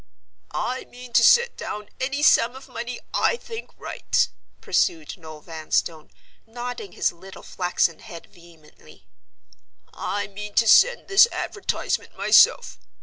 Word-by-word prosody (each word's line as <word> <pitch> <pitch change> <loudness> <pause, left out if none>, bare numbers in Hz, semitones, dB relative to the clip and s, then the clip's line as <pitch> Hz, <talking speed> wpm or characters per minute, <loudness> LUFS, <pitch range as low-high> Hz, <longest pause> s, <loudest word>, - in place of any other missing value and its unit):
"I 255 +1 -3
mean 250 -1 -13
to - - +5
set 480 0 +5
down 210 0 -7
any 280 +3 -2
sum 245 -4 +4
of 265 +1 -12
money 245 -1 -6
I - - +2
think 455 -1 -9
right," - - -1 0.3
pursued 335 -4 -1
Noel 160 -4 -12
Vanstone, 160 0 -3 0.4
nodding 240 -4 -7
his - - 0
little 190 +3 -13
flaxen 175 -2 -1
head 175 -7 -11
vehemently. 155 - -20 0.9
"I 205 +1 -3
mean 205 +1 -9
to 230 - +3
send 485 - +5
this 390 +4 +6
advertisement 405 - -3
myself. - - +4
225 Hz, 130 wpm, -23 LUFS, 175-275 Hz, 0.9 s, this